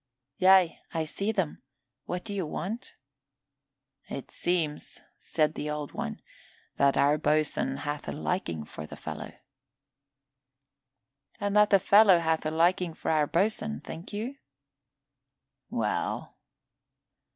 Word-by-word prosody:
"Yea, 185 -2 +5 0.2
I 160 - +1
see 200 +7 -2
them. 190 -8 -2 0.4
What 180 0 -4
do 205 - -6
you 195 -2 -1
want?" 190 +9 -5 1.1
"It 135 - -6
seems," 165 -4 -2 0.2
said 155 -1 +1
the 150 - -4
Old 150 -1 -4
One, - - -5 0.5
"that 140 0 +4
our 145 +2 +4
boatswain 150 -3 +1
hath 145 +1 -4
a - - -2
liking 145 - -2
for 75 +1 -8
the - - -9
fellow." - - -6 2.1
"And 205 0 -1
that 210 0 +6
the 200 - +7
fellow 200 0 +6
hath 160 -2 0
a - - +1
liking 170 +1 +2
for - - -2
our 155 -2 +3
boatswain, 215 +6 0
think 165 - -9
you?" 230 +7 -4 1.3
"Well?" 110 -2 -2
165 Hz, 125 wpm, -28 LUFS, 150-195 Hz, 2.1 s, the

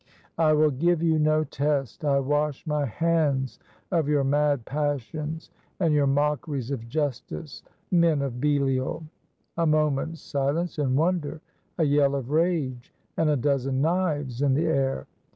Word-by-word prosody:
"I 155 -2 +4
will 155 0 +4
give 170 +5 +1
you 160 -2 +3
no 155 0 +3
test. 140 -1 -2
I 140 -2 +3
wash 145 +2 -1
my 150 -2 0
hands 145 -1 0 0.3
of 165 -5 +1
your 145 -2 +2
mad 145 -2 +1
passions, 150 +2 -3 0.3
and 165 -5 +2
your 145 -2 +3
mockeries 145 -2 0
of 115 -4 -5
justice, 145 +1 -4 0.3
men 170 -5 +3
of 125 -3 -4
Belial!" 140 0 0 0.5
A 165 -1 +2
moment's 155 +1 +1
silence 150 +4 -2
and 130 -3 +1
wonder, 160 -2 0 0.4
a 165 - +2
yell 140 -1 +3
of 135 -1 -4
rage, 155 -7 0 0.2
and 160 -1 +2
a 150 - +3
dozen 135 0 0
knives 150 -7 0
in 140 -2 +3
the 160 +4 +1
air. 135 - 0
145 Hz, 150 wpm, -26 LUFS, 135-155 Hz, 0.5 s, I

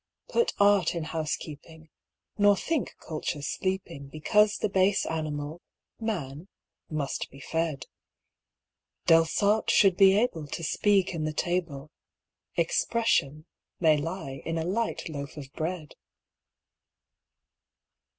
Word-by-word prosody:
Put 470 - +1
art 200 -4 +4
in 170 - -2
housekeeping, 160 0 -5 0.4
nor 205 -1 +5
think 315 - -2
culture 155 -2 -4
sleeping 180 -5 -3
Because 205 +9 +2
the - - 0
base 195 0 +2
animal, 155 0 -4 0.4
man, 175 - -4 0.4
must 145 -3 -3
be 135 - -14
fed. 160 +1 -2 1.2
Delsarte 200 +6 +3
should 195 -3 +5
be 195 0 +7
able 170 -10 0
to 165 - -5
speak 195 +3 +2
in 160 -2 -3
the 155 - -2
table 160 -4 -2 0.7
'Expression' 155 - +1 0.3
may 160 -3 +5
lie 150 -3 -4
in 165 0 -2
a 160 - -1
light 220 +6 -1
loaf 140 -2 -6
of 140 -1 -9
bread. 160 -1 -4
165 Hz, 110 wpm, -28 LUFS, 150-195 Hz, 1.2 s, be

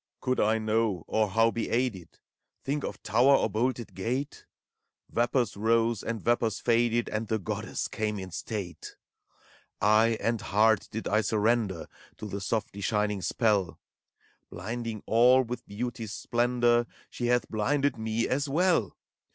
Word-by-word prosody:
Could 130 0 -1
I 110 +1 +3
know, 110 -5 0
or 110 -1 +1
how 115 +3 +3
be 115 - -3
aided? 115 -8 -2 0.5
Think 145 +1 -2
of - - -6
tower 125 +8 +4
or - - +2
bolted 120 +1 -1
gate? 125 +9 -4 0.7
Yapors 120 -1 +1
rose 115 +1 +1
and 115 -1 -3
vapors 115 -3 +1
faded, 120 0 +2
And 110 +1 -3
the 110 - 0
Goddess 95 - -4
came 105 -1 -2
in 95 -1 -7
state 90 -2 -6 0.8
I - - -1 0.3
Eye - - -3
and 115 -2 -1
heart 110 0 +2
did 110 - -5
I 110 +1 +2
surrender 110 -4 0 0.3
To - - -7
the 100 -1 -5
softly 100 -1 -3
shining 105 -1 0
spell: 100 +1 +1 0.7
Blinding 115 -2 -5
all 125 +3 +5
with 125 0 -6
Beauty's 115 0 -5
splendor, 120 0 +1 0.2
She 120 - -3
hath 125 0 +2
blinded 135 +6 0
me, 110 +1 -1
as 140 +2 -1
well. 165 - +1
115 Hz, 145 wpm, -28 LUFS, 105-120 Hz, 0.8 s, all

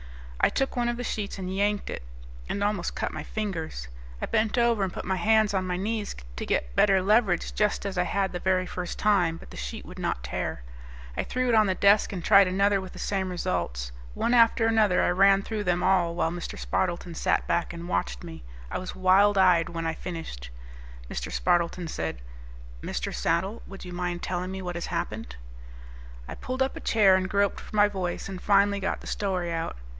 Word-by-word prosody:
I - - +6
took 270 - -1
one 240 -1 +1
of 240 - -2
the 245 - -4
sheets 210 -4 -3
and 190 0 -4
yanked 205 +1 0
it, - - -5 0.5
and 200 - -1
almost 205 -4 -1
cut - - -2
my 155 - -4
fingers. 160 - -4 0.3
I - - -2
bent 220 +1 0
over 235 -3 +3
and 190 - -1
put - - -6
my 190 0 0
hands 215 0 +3
on 185 -1 0
my 180 -1 -1
knees 210 +2 -2 0.2
to - - -4
get 60 -1 -1
better 195 -2 +5
leverage 205 -3 +2
just 210 -1 0
as 200 -1 -3
I 180 -1 +1
had 195 -1 0
the 175 - -4
very 185 0 +1
first 180 -1 -5
time, 180 -6 +2
but - - -14
the - - -10
sheet - - -6
would - - -10
not 60 - -2
tear. - - -4 0.5
I - - -1
threw 255 0 -1
it - - +3
on 215 -2 +5
the 190 - +1
desk 200 +2 +4
and 180 -4 -5
tried 200 -2 +7
another 195 +1 +2
with 185 - -9
the - - -11
same 190 -2 -1
results. 85 - -2 0.2
One 235 - +1
after 230 -1 +5
another 220 -4 +3
I - - +3
ran 195 +2 +5
through 215 -1 -3
them 180 0 +1
all 180 -3 +2
while 165 - 0
Mr. 175 0 -6
Spardleton 175 -1 -2
sat - - +1
back 170 0 0
and 170 0 -7
watched 60 - -2
me. 80 -5 -9 0.3
I - - -2
was 185 - -6
wild 195 +2 +4
eyed 180 -3 +5
when 165 -1 -4
I 160 - 0
finished. 165 - -7 0.6
Mr. - - -4
Spardleton 170 - +1
said, 80 - -4 0.6
"Mr. - - -3
Saddle, 190 +7 0
would 195 -1 -10
you 180 - -7
mind 175 0 -3
telling 180 0 -2
me 190 0 -5
what 180 -1 -3
has 170 0 -4
happened?" - - -4 0.9
I - - -6
pulled 255 +1 -2
up 265 - -3
a - - -6
chair, 195 -4 +4
groped 200 0 +1
for - - -10
my 205 0 +6
voice, 185 -4 -3
and 190 -2 -7
finally 200 0 +3
got 190 - -2
the - - -12
story 185 -4 -1
out. 165 - -3
190 Hz, 210 wpm, -27 LUFS, 170-205 Hz, 0.9 s, tried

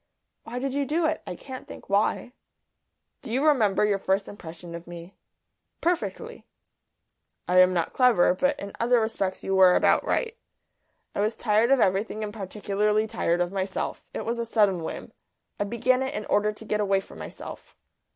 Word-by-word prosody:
"Why 240 - -6
did 265 +1 -2
you 285 0 0
do 315 +4 0
it? 315 0 0
I - - -4
can't 260 -2 -9
think - - -11
why." 205 +4 0 0.9
"Do - - -8
you 265 +5 +1
remember 220 -9 +3
your 205 -1 +1
first 195 +1 0
impression 170 -3 -9
of 170 0 -8
me?" 175 +2 -10 0.7
"Perfectly." 360 +7 -2 1.0
"I 180 +1 +4
am 185 0 +7
not 175 -2 -1
clever, 240 -9 +4
but 275 +9 0
in 200 - -7
other 240 +1 +3
respects 210 -4 -2
you 195 - -1
were 185 -1 +7
about - - +4
right. 460 -2 -1 0.8
I - - -4
was 215 +2 0
tired 220 +1 +2
of 275 -1 +5
everything 205 +2 +1
and 205 -1 -5
particularly 210 +1 0
tired 175 -6 0
of 175 0 0
myself. 190 -1 -3
It - - -5
was 235 +1 -2
a - - 0
sudden 205 -6 +2
whim. 160 - -6 0.5
I 205 - 0
began 255 +4 +1
it 265 0 -2
in 210 - -3
order 210 +1 +2
to 215 +1 -12
get 210 0 -1
away 195 -1 +2
from - - -12
myself." - - -9
210 Hz, 180 wpm, -26 LUFS, 190-245 Hz, 1.0 s, am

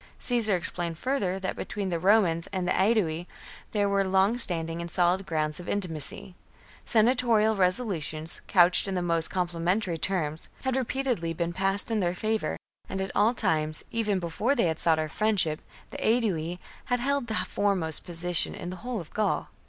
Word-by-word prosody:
Caesar 230 -5 +1
explained 170 -1 -3
further 200 -6 -1
that 190 - -3
between 200 -2 -4
the 170 -2 -1
Romans 180 -3 +3
and 185 -2 -2
the - - +1
Aedui 185 -5 +1 0.4
there 205 -2 +1
were 200 0 +2
long 190 +3 +3
standing 170 -7 -1
and 170 - -6
solid 180 +2 +2
grounds 155 -1 -1
of 180 - -8
intimacy; 180 -2 -3 0.5
sena 230 +2 +4
torial 225 -4 +3
resolutions, 180 -5 -1
couched 180 0 +4
in 195 - -2
the 180 - -1
most 165 -2 +1
compli 175 -2 -2
mentary 180 -1 0
terms, 160 -5 -1
had 260 -1 0
repeatedly 250 -9 -1
been 170 +1 -2
passed 195 +4 +3
in 220 - +1
their 175 -2 0
favour, 220 +3 -1 0.3
and 190 - -3
at 190 0 -2
all 220 +4 +3
times, 155 -5 0
even 215 -4 0
before 185 +10 0
they 175 - +2
sought 160 0 +1
our 155 0 -1
friendship, 180 -3 +1 0.3
the - - -6
Aedui 185 -8 +1 0.3
had 245 0 0
held 280 0 0
the 220 - -2
foremost 190 -8 0
position 175 0 -1
in 175 - -6
the 185 - -7
whole 245 +2 -4
of 165 - -10
Gaul! 215 -1 0
185 Hz, 175 wpm, -27 LUFS, 170-215 Hz, 0.5 s, sena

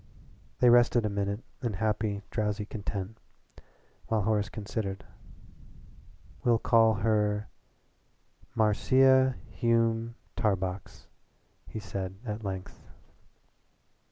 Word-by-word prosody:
They 125 - +7
rested 120 -1 +5
a - - +1
minute 100 +2 -2 0.2
in 120 -4 -2
happy, 105 0 -1
drowsy 105 -1 -1
content, 100 0 -5 0.9
while 110 -2 +1
Horace 105 0 +1
considered. 100 -2 -4 1.4
"We'll 120 -2 +4
call 115 -1 +4
her 105 0 +1 1.1
Marcia 130 +4 +4 0.2
Hume 115 0 +1 0.2
Tarbox," 95 -4 -2 0.6
he - - -7
said 95 -3 -5
at 110 0 -4
length. 95 -2 -6
110 Hz, 90 wpm, -29 LUFS, 100-115 Hz, 1.4 s, They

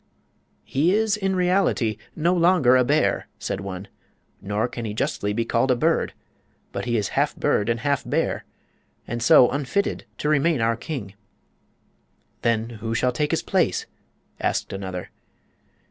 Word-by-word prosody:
"He 165 +8 +2
is, 220 -1 +2
in 195 -2 -1
reality, 180 - +1 0.2
no 170 +3 +2
longer 170 -7 +4
a 130 - +5
bear," 150 +5 +1
said - - -3
one; 95 0 -6 0.5
"nor 105 +3 -1
can 120 -1 -6
he 105 -2 -4
justly 105 -2 -1
be 115 +2 -1
called 115 +3 +1
a 125 - +4
bird. 160 +7 +1 0.6
But - - -4
he 120 -1 +1
is 100 -3 -1
half - - 0
bird 105 - +1
and 115 0 0
half 140 +1 0
bear, - - -1 0.6
and 120 +1 -4
so 120 +1 +6
unfitted 145 +9 -1
to - - -2
remain 150 0 +2
our 115 0 +2
king." 115 - -6 1.3
"Then 115 -1 +1
who 115 0 -2
shall 125 +2 +2
take 145 +4 -1
his - - 0
place?" - - +1 0.5
asked - - -1
another. 95 -2 -5
125 Hz, 155 wpm, -24 LUFS, 115-155 Hz, 1.3 s, so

